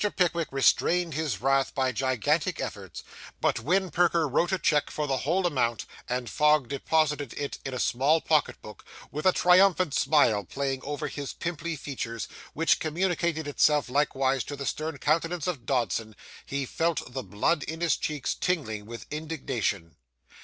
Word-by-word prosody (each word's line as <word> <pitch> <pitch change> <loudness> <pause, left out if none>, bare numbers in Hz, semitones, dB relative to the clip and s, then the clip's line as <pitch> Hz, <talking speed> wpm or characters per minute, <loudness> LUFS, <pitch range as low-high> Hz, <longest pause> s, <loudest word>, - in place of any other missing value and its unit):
Pickwick 170 -3 +1
restrained 165 +5 +2
his 155 -1 -2
wrath 135 +1 +1
by 130 -1 +1
gigantic 130 -2 0
efforts; - - -6 0.4
but - - +1
when 185 +9 +1
Perker 170 -1 +2
wrote 165 +7 +1
a 190 - +2
cheque 150 -4 +1
for 150 - -2
the 135 -2 0
whole 175 +8 0
amount, 120 -8 0 0.2
and 125 0 -2
Fogg 150 +4 +3
deposited 145 -1 0
it 145 -1 -4
in 135 - -4
a 130 - -4
small 140 +8 +2
pocket 155 -1 +1
book, 105 -2 -11 0.3
with 150 +5 -1
a - - +7
triumphant 180 -3 +4
smile 120 -12 +3
playing 135 +6 -3
over 145 +1 -3
his 140 -2 -5
pimply 170 -1 -4
features, 120 -6 -5 0.3
which 165 +2 +2
communicated 165 -1 -1
itself 145 -1 +2
likewise 135 -1 +1
to 145 - -5
the 140 0 -6
stern 155 +6 -3
countenance 165 +3 0
of 145 -11 -4
Dodson, 115 -4 -1 0.3
he 140 0 -2
felt 165 -3 -2
the 130 - -3
blood 110 - 0
in 160 +3 -5
his 170 -4 +3
cheeks 150 -4 -2
tingling 110 - -2
with 115 0 -8
indignation. 130 - -3
145 Hz, 160 wpm, -27 LUFS, 130-165 Hz, 0.4 s, a